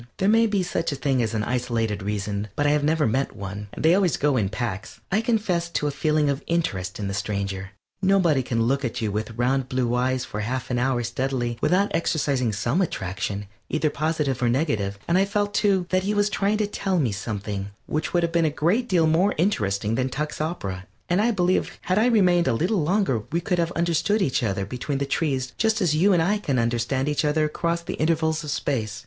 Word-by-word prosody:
There 190 - +1
may 225 +2 +5
be 205 -3 0
such 170 -2 -1
a - - -2
thing 135 -2 0
as 115 -1 -1
an 105 - 0
isolated 115 -3 -1
reason, 100 +1 -3
but 145 - 0
I 145 - +4
have 150 -1 +2
never 155 0 +2
met 130 +3 0
one 100 0 -6
they 160 +2 +4
always 185 -3 +2
go 145 -1 +2
in 105 -6 +1
packs. 110 -2 -4
I 205 +4 +2
confess 210 -7 0
to 160 - -1
a 145 - +1
feeling 150 +1 +1
of 140 0 0
interest 95 - -1
in 100 - -3
the 100 - -3
stranger. 100 -1 -3 0.3
Nobody 185 -7 +3
can 115 -2 0
look 135 +4 +1
at 120 - -2
you 110 -2 -1
with 110 +2 -4
round 130 +2 +1
blue 125 -2 0
eyes 130 +1 0
for 105 - -6
half 125 +4 -3
an 120 - +1
hour 125 -1 +1
steadily 120 0 -2
without 195 +3 +2
exercising 140 -7 0
some 120 - 0
attraction, 100 - -3 0.2
either 155 -1 0
positive 150 -4 -1
or 120 - +3
negative, 110 -7 0
and 175 +2 +3
I 195 - +4
felt, 205 +1 -1
too, 195 -3 +2
that 185 0 +3
he 205 +3 -1
was 205 0 +2
trying 200 +2 +1
to 215 - +1
tell 195 -2 -1
me 135 -9 +1
something 100 -1 -4 0.2
which 155 - -2
would 175 -1 +2
have 170 - 0
been 170 0 +2
a - - -14
great 225 +9 +2
deal 175 -4 +3
more 170 +6 +3
interesting 105 - 0
than 130 +2 0
Tuck's 150 +3 -3
opera, 100 - -4 0.2
and 180 +3 +3
I 230 - +3
believe 185 -4 +1
had 185 +3 +1
I 225 - +4
remained 180 -7 +4
a 130 - +3
little 180 - +1
longer 175 - +1
we 170 - +1
could 175 +1 -1
have 170 0 0
understood 170 +5 +1
each 135 - 0
other 100 -4 -1
between 125 +6 -3
the 140 - -1
trees 130 -6 -1
just 220 0 +2
as 175 -7 +2
you 190 +6 +4
and 175 -3 +4
I 205 +5 +1
can 140 -10 -1
understand 120 +3 0
each 150 +1 0
other 155 +1 +2
across 170 +2 -1
the - - -4
intervals 160 -1 +1
of 150 - -6
space. 110 -7 -2
145 Hz, 225 wpm, -24 LUFS, 115-175 Hz, 0.3 s, may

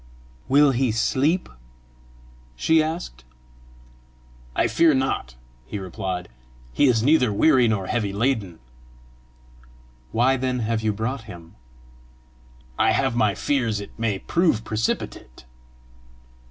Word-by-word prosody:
"Will 140 +1 +5
he 130 -1 +1
sleep?" 140 - +1 1.1
she 160 - +3
asked. 155 - -5 1.3
"I - - +2
fear 165 -3 +3
not," 130 - -2 0.3
he 85 - -5
replied; 95 -1 -5 0.5
"he 145 - +3
is 115 -4 +2
neither 130 -4 +3
weary 125 +3 +4
nor 105 -4 -1
heavy 105 -1 -1
laden." 105 -5 -1 1.5
"Why 130 +3 +2
then 125 -1 -2
have 110 0 -1
you 110 -1 +1
brought 110 +4 -4
him?" 85 -6 -12 1.3
"I - - +4
have 135 -3 0
my 110 -4 +2
fears 115 -5 0
it 100 - -9
may 110 -4 0
prove 160 - +1
precipitate." 105 - -4
115 Hz, 115 wpm, -23 LUFS, 100-135 Hz, 1.5 s, Will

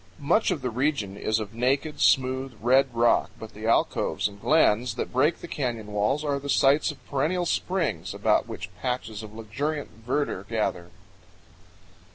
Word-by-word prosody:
Much 175 +10 +2
of 170 -8 -2
the 125 - -1
region 125 -5 -1
is 110 +2 0
of 105 -1 -6
naked, 135 +6 0
smooth, 130 -1 +2
red 130 +4 +4
rock, 120 0 +3
but 110 -1 -9
the 110 +2 -6
alcoves 115 - +1
and 100 -1 -12
glens 125 -6 +3
that - - -4
break 145 +6 +2
the - - -7
canyon 120 -9 -3
walls 105 +9 0
are 140 -1 0
the 140 +1 -7
sites 140 +2 +4
of - - -9
perennial 160 +6 0
springs, 170 - -1
about - - +1
which 90 +1 -7
patches 125 -4 -3
of 110 -1 -9
luxuriant 130 +8 -4
verdure 125 -5 -1
gather. 105 -6 -2
130 Hz, 165 wpm, -26 LUFS, 110-145 Hz, -, red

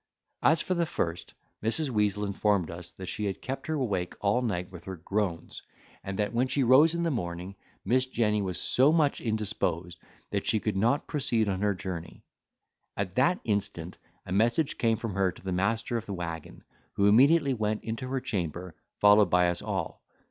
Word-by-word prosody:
As 160 +2 +4
for 185 - -1
the 170 -2 0
first, 85 - -3 0.3
Mrs. 135 +6 +1
Weazel 105 -2 +1
informed 100 -3 0
us, 85 +1 -7
that 95 - -8
she 105 +3 -3
had 95 -2 -3
kept 135 +6 -5
her 160 - -1
awake 100 -11 -2
all 105 +5 +1
night 90 -7 -2
with 90 -2 -11
her 95 - -5
groans; 90 -1 -3 0.4
and 95 0 -5
that 105 +2 -1
when 125 +3 +2
she 135 +1 +1
rose 145 +7 +6
in 170 - -1
the 165 - +1
morning, 90 - -4 0.3
Miss 130 +5 +3
Jenny 105 -4 +1
was 90 -5 -2
so 135 +4 +4
much 155 -3 +2
indisposed 90 -6 -2 0.3
that - - -2
she 110 - +3
could 105 -1 -2
not 120 +9 +1
proceed 120 -7 0
on 95 -1 -1
her 105 -1 +1
journey. 90 -2 -7 0.7
At 95 -3 -2
that 140 - +2
instant, 100 -5 -2 0.3
a - - -8
message 115 - +1
came 115 -1 +2
from 115 -2 -4
her 95 -1 +1
to - - -16
the 95 - -3
master 110 +6 0
of 115 - -6
the 100 - -4
waggon, 85 -3 -6 0.3
who 100 - +1
immediately 140 +7 +5
went 110 -2 -2
into 115 +3 -4
her 135 +1 -1
chamber, 90 -4 -4 0.3
followed 105 -1 +6
by 90 0 +4
us 85 0 -2
all. - - -4
105 Hz, 190 wpm, -28 LUFS, 90-125 Hz, 0.7 s, rose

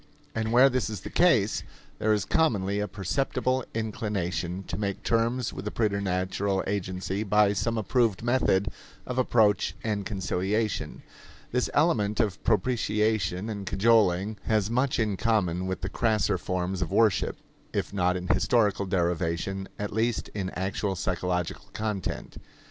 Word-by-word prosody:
And 110 0 -1
where 125 +3 +7
this 130 -4 0
is 105 -4 -5
the - - -8
case, 115 - +3 0.4
there 110 - +2
is 105 -3 +1
commonly 100 -11 +1
a 105 - -1
perceptible 130 +5 -1
inclination 95 -5 -2
to 85 - -5
make 100 0 -3
terms 115 +1 +1
with - - -6
the 105 - -2
preternatural 100 -2 0
agency 95 0 -2
by 105 -1 +3
some 115 +3 -1
approved 110 0 +1
method 115 -5 +2 0.4
of 125 0 -2
approach 110 -5 +3
and 105 -2 -1
conciliation. 100 +2 -2 0.5
This - - 0
element 105 +1 +2
of 105 -5 0
propitiation 105 -3 +1
and 100 -3 -5
cajoling 105 -2 +3
has 110 -1 +1
much 130 +2 +1
in 105 -4 0
common 95 -6 +1
with 95 - -3
the 95 - -2
crasser 110 0 +1
forms 90 0 -2
of 85 - -1
worship 110 -5 +2 0.3
if - - -2
not 90 -2 +1
in 90 0 -6
historical 105 -4 +2
derivation, 90 +1 -1
at 105 0 -4
least 115 +2 0
in 95 -3 -3
actual 95 +1 -1
psychological 90 -1 -2
content. 105 -4 -4
105 Hz, 145 wpm, -27 LUFS, 95-110 Hz, 0.5 s, where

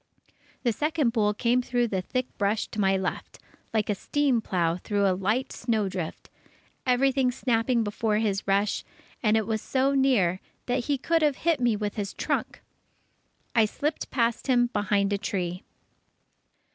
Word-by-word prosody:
The 240 -3 +2
second 300 -2 0
bull 210 -3 +2
came 245 +3 +2
through 245 -1 0
the 190 -3 -1
thick 255 +7 -2
brush 205 +2 +1
to 215 - -6
my 195 0 +3
left, 190 - -4 0.3
like 220 -2 0
a 210 - +1
steam 270 +3 +1
plow 170 -4 0
through 200 +2 0
a 190 - +3
light 215 +8 -1
snowdrift, 195 -8 -2 0.6
everything 260 0 +3
snapping 240 -1 +1
before 210 0 0
his 205 -3 -1
rush, 200 +1 +1 0.4
and 220 -1 +3
was 220 -1 -1
so 270 +1 +1
near 240 -10 +3 0.3
that 245 -1 -1
he 285 -1 +1
could 330 +5 +1
have 295 -3 +3
hit 335 -3 +3
me 240 -3 +2
with 210 0 -3
his 200 -2 -3
trunk. - - -2 0.9
I 225 -3 +5
slipped 290 +8 -3
past 235 -1 0
him 245 -2 +3
behind 205 0 +1
a 200 - 0
tree. 180 -3 -3
225 Hz, 160 wpm, -27 LUFS, 200-255 Hz, 0.9 s, I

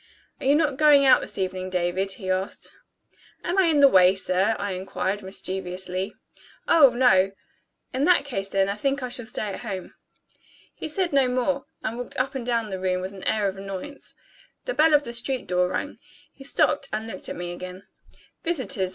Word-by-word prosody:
"Are - - -3
you 280 - +5
not 295 -3 +1
going 295 -2 +6
out 265 - +6
this - - -4
evening, 185 -1 -3
David?" 185 +2 0
he 190 -3 -4
asked. 185 +1 -3 0.7
"Am 360 +2 0
I 380 - +5
in 310 -3 +3
the 280 - +9
way, 185 -5 +6
sir?" 190 +3 +1
I 205 0 -3
inquired 190 +2 -3
mischievously. 190 0 -4 0.5
"Oh, 310 -5 +7
no!" 215 -6 +3 0.6
"In 265 +3 +1
that 360 -4 +4
case 195 -8 -3
then, 195 0 +1
I 200 - 0
think 275 +5 -1
I 250 - -3
shall 245 -2 -3
stay 245 - -2
at - - -6
home." 195 -6 -6 0.8
He - - -6
said 345 +1 -1
no 275 -2 +4
more, 255 +2 0 0.2
and 230 +2 -3
walked 245 - -6
up 270 +2 0
and 265 -3 -4
down 230 -2 -1
the 190 -1 -4
room 185 -1 0
with 185 +2 -5
an 190 - -10
air 215 -2 +1
of 195 -1 -1
annoyance. 195 +9 -8 0.5
The - - -2
bell 310 0 +5
of 290 - +3
the 235 - -6
street 255 +2 -1
door 180 0 +1
rang. 240 +10 -4 0.3
He 270 - -14
stopped 275 +1 +1
and 215 +1 -3
looked 190 -5 -6
at - - -5
me 175 0 -5
again. 185 +2 -8 0.6
"Visitors?" 260 - -1
215 Hz, 200 wpm, -25 LUFS, 190-275 Hz, 0.8 s, the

